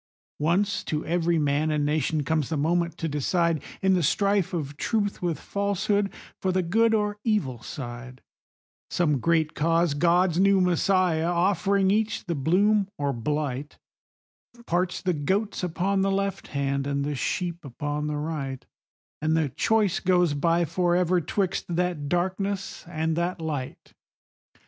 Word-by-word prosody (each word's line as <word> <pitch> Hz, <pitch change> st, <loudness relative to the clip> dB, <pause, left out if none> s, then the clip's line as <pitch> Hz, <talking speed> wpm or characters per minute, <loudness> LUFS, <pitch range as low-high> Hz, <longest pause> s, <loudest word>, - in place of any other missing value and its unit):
Once 185 Hz, +7 st, +1 dB
to 155 Hz, 0 st, -3 dB
every 170 Hz, 0 st, +1 dB
man 150 Hz, +1 st, +1 dB
and 150 Hz, -1 st, +1 dB
nation 150 Hz, 0 st, 0 dB
comes 155 Hz, -2 st, 0 dB
the 160 Hz, -, -1 dB
moment 170 Hz, +3 st, 0 dB
to 165 Hz, -, -2 dB
decide, 160 Hz, +2 st, 0 dB, 0.2 s
In 190 Hz, 0 st, +4 dB
the 180 Hz, -, +2 dB
strife 200 Hz, +3 st, +2 dB
of 145 Hz, -5 st, -4 dB
Truth 205 Hz, +4 st, -1 dB
with 170 Hz, -5 st, -1 dB
Falsehood, 200 Hz, 0 st, 0 dB, 0.3 s
for 190 Hz, -, +1 dB
the 185 Hz, 0 st, +1 dB
good 225 Hz, +6 st, +3 dB
or 210 Hz, -1 st, -1 dB
evil 145 Hz, -, 0 dB
side; 125 Hz, -1 st, -8 dB, 0.7 s
Some 150 Hz, -6 st, +1 dB
great 160 Hz, +1 st, +1 dB
cause, 165 Hz, 0 st, +2 dB
God's 175 Hz, +3 st, +3 dB
new 195 Hz, 0 st, +5 dB
Messiah, 180 Hz, -2 st, +2 dB
offering 190 Hz, +2 st, +2 dB
each 220 Hz, +1 st, 0 dB
the 175 Hz, -, -1 dB
bloom 195 Hz, +8 st, +2 dB
or 140 Hz, -1 st, -1 dB
blight, 145 Hz, +3 st, -3 dB, 0.9 s
Parts 180 Hz, +1 st, -1 dB
the 180 Hz, -, +1 dB
goats 190 Hz, +8 st, -1 dB
upon 185 Hz, +3 st, 0 dB
the 195 Hz, -, +2 dB
left 195 Hz, 0 st, -1 dB
hand, 140 Hz, -1 st, -1 dB
and 140 Hz, 0 st, -1 dB
the 150 Hz, -, -2 dB
sheep 170 Hz, +5 st, -2 dB
upon 145 Hz, +2 st, -3 dB
the 150 Hz, -1 st, -2 dB
right, 145 Hz, -4 st, -4 dB, 0.6 s
And 155 Hz, +1 st, +2 dB
the 155 Hz, -3 st, +1 dB
choice 215 Hz, -, +1 dB
goes 180 Hz, -4 st, +2 dB
by 170 Hz, +4 st, +2 dB
forever 175 Hz, +2 st, +2 dB
'twixt 185 Hz, +3 st, -1 dB
that 170 Hz, -4 st, -1 dB
darkness 190 Hz, +3 st, -2 dB
and 160 Hz, -1 st, -1 dB
that 175 Hz, +1 st, -1 dB
light. 150 Hz, -5 st, -5 dB
170 Hz, 150 wpm, -26 LUFS, 150-190 Hz, 0.9 s, new